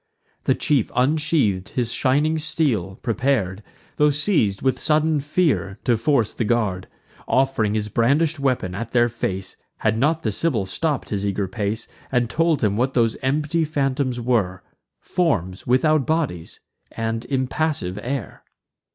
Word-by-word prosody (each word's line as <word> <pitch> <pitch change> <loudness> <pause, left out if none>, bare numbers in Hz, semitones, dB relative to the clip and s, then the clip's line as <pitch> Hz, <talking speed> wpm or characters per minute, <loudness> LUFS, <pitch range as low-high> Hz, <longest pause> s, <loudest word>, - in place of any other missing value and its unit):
The - - +3
chief 145 - +1
unsheath'd 135 - +1
his 120 -2 -1
shining 150 +5 +2
steel, 125 - -1
prepar'd, 110 -5 0 0.4
Tho' 150 0 +5
seiz'd 145 - +1
with 130 -1 +1
sudden 155 0 +2
fear, 140 - 0
to 120 - +3
force 115 -1 +1
the - - -2
guard, 105 -5 0 0.4
Off'ring 130 -6 +1
his 105 -1 -1
brandish'd 140 +8 +2
weapon 130 -9 0
at 115 +4 -5
their 120 -1 +4
face; 95 -5 -4 0.2
Had 110 +1 0
not 155 +5 +1
the 110 - 0
Sibyl 115 -2 0
stopp'd 150 +8 -2
his 100 -2 -2
eager 100 -1 -1
pace, 105 +3 -3 0.2
And 125 -2 +1
told 165 -4 +1
him 100 -2 +2
what 130 +3 0
those 115 -2 +2
empty 150 +5 0
phantoms 135 -4 -1
were: 110 -7 0 0.4
Forms 95 - -1
without 140 +3 +3
bodies, 150 - -2 0.3
and 115 0 -3
impassive 130 - -1
air. 130 +2 -5
125 Hz, 140 wpm, -22 LUFS, 105-150 Hz, 0.4 s, Tho